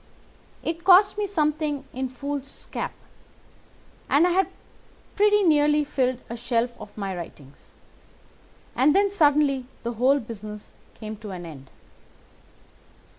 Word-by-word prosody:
It 330 +1 -3
cost 380 +2 +6
me 415 - 0
something 305 -5 -1
in 260 0 -3
foolscap, 280 +2 -5 1.2
and 295 +5 +5
I 360 - +2
had 380 +2 +3 0.7
pretty 415 0 +4
nearly 300 -2 +4
filled 255 -3 -1
a 235 - -5
shelf 240 0 -1
with 205 - -12
my 195 -2 -3
writings. 145 -5 -11 1.0
And 285 +4 +4
then 400 0 +3
suddenly 290 -7 +3 0.2
the 235 0 -2
whole 260 +5 +3
business 210 -3 -9 0.2
came 215 -1 -7
to 210 0 -9
an 180 -2 -7
end." 135 -5 -11
275 Hz, 125 wpm, -25 LUFS, 225-310 Hz, 1.2 s, cost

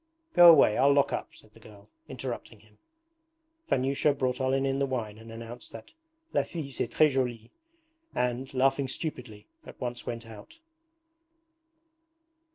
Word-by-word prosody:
'Go 175 -1 +9
away. 135 -10 +6
I'll 140 +2 +5
lock 140 0 +3
up,' - - -5
said 110 - -20
the 115 - -17
girl, 105 -2 -16 0.2
interrupting 120 -4 -6
him. 105 -1 -25 0.9
Vanyusha 140 +2 +1
brought 130 -1 -1
Olenin 135 +1 0
the 140 - +1
wine 110 -5 -4
and 115 0 -12
announced 115 +2 -9
that 115 -1 -11 0.4
'La - - +3
fille 155 -5 -6
c'est 120 - -2
tres 155 +2 +3
joulie,' 120 -4 -2 0.6
and, 125 +1 -1
laughing 135 +1 +1
stupidly, 125 -7 -6 0.2
at - - -13
once 120 -1 -5
went 115 -1 -5
out. 110 - -13
125 Hz, 145 wpm, -28 LUFS, 115-135 Hz, 0.9 s, Go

